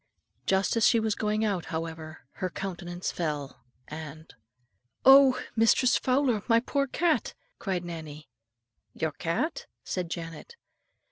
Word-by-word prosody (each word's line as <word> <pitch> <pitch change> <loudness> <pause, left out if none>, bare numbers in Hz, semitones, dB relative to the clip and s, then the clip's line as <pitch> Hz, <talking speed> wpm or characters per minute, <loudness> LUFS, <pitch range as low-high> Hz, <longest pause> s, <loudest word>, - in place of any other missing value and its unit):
Just 195 +3 +2
as 230 - +2
she 230 - +4
was 220 -1 0
going 215 +1 0
out, 195 -5 -1
however, 160 -1 -6 0.2
her 185 - 0
countenance 175 -1 -5
fell, 150 -5 -4 0.2
and, 155 +1 -9 0.7
"Oh! 270 -1 +8 0.2
Mistress 230 +3 +4
Fowler, 255 -4 +2
my 230 -1 +5
poor 275 +3 -1
cat," 325 +4 0 0.2
cried 185 -4 -2
Nannie. 155 -3 -8 0.7
"Your 160 -1 -1
cat?" 310 - -2 0.2
said 180 -2 -3
Janet. 165 - -7
185 Hz, 125 wpm, -28 LUFS, 165-235 Hz, 0.7 s, Oh